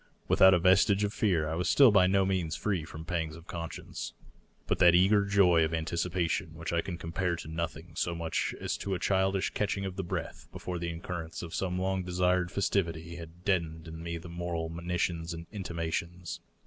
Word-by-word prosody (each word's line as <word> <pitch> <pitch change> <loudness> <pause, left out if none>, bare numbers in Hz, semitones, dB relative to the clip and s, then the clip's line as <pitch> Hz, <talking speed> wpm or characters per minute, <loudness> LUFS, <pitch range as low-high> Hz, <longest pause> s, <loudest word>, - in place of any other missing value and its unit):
Without 95 0 +7
a - - +4
vestige 95 +3 +4
of 105 0 -1
fear, 85 -8 +1
I 80 - -2
was 90 +2 0
still 135 -5 +7
by 95 -3 +5
no 95 0 +3
means 90 -4 0
free 95 -7 -1
from 80 0 -9
pangs 80 -2 -2
of 85 0 -12
conscience. 85 -2 -6 0.5
But - - 0
that 85 -1 +7
eager 100 +3 +5
joy 95 -5 +5
of 80 +1 0
anticipation 85 0 -1
which 80 +1 -4
I 85 - +2
can 85 -1 -5
compare 85 +1 -1
to 80 - -8
nothing 80 +1 -4
so 85 0 -1
much 85 -1 -1
as - - -2
to 100 -1 -2
a - - -3
childish 95 0 +1
catching 100 -1 -1
of 95 -1 -5
the 95 - -1
breath 85 - -5
before 90 -1 -5
the 85 0 -2
occurrence 85 -1 -5
of 85 - -7
some 90 -1 -1
long 95 0 0
desired 90 0 +1
festivity, 85 -4 -1
had 85 +1 -11
deadened 85 -4 0
in 80 0 -8
me 85 0 -4
the 85 - -9
moral 85 -1 -3
monitions 85 0 -2
and 85 0 -8
intimations. 85 -2 -4
85 Hz, 200 wpm, -30 LUFS, 85-95 Hz, 0.5 s, Without